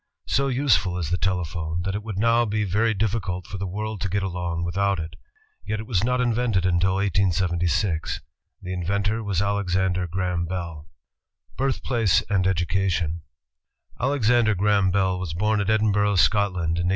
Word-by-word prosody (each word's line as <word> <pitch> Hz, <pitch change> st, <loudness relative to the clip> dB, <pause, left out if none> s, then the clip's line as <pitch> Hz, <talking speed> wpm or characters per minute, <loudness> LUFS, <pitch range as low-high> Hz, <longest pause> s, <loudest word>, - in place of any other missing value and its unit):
So 140 Hz, 0 st, +1 dB
useful 120 Hz, -, +2 dB
is 85 Hz, -3 st, -3 dB
the 90 Hz, -, +2 dB
telephone, 85 Hz, -2 st, -2 dB
that 95 Hz, +1 st, -2 dB
it 105 Hz, -, -3 dB
would 105 Hz, -3 st, -6 dB
now 115 Hz, +3 st, +3 dB
be 105 Hz, -1 st, -1 dB
very 110 Hz, +3 st, +1 dB
difficult 95 Hz, -3 st, -1 dB
for 100 Hz, -, -7 dB
the 100 Hz, -, -3 dB
world 105 Hz, +2 st, -4 dB
to 100 Hz, -, -1 dB
get 100 Hz, +2 st, 0 dB
along 90 Hz, -2 st, -3 dB
without 100 Hz, +3 st, 0 dB
it. 80 Hz, 0 st, -6 dB, 0.5 s
Yet 110 Hz, -, -3 dB
it 110 Hz, -, -6 dB
was 105 Hz, -5 st, 0 dB
not 125 Hz, +1 st, +1 dB
invented 120 Hz, -6 st, +1 dB
until 95 Hz, +1 st, +2 dB
1876. 90 Hz, -2 st, 0 dB, 0.4 s
The 90 Hz, -, -4 dB
in 90 Hz, -1 st, -3 dB
ventor 100 Hz, +5 st, 0 dB
was 100 Hz, -2 st, 0 dB
Alexander 95 Hz, -3 st, 0 dB
Graham 90 Hz, 0 st, -1 dB
Bell. 85 Hz, -3 st, -5 dB, 0.7 s
Birthplace 120 Hz, -6 st, +1 dB
and 95 Hz, -2 st, +2 dB
Education 85 Hz, -2 st, 0 dB, 0.8 s
Alexander 120 Hz, -5 st, +2 dB
Graham 100 Hz, 0 st, +2 dB
Bell 95 Hz, -1 st, +1 dB
was 85 Hz, -4 st, -4 dB
born 105 Hz, +3 st, +1 dB
at 100 Hz, -, -2 dB
Edinburgh, 105 Hz, -2 st, +2 dB
Scot 100 Hz, +3 st, +4 dB
land, 85 Hz, -2 st, -1 dB
in 85 Hz, -, 0 dB
1847. -, -, +1 dB
95 Hz, 170 wpm, -24 LUFS, 90-105 Hz, 0.8 s, Scot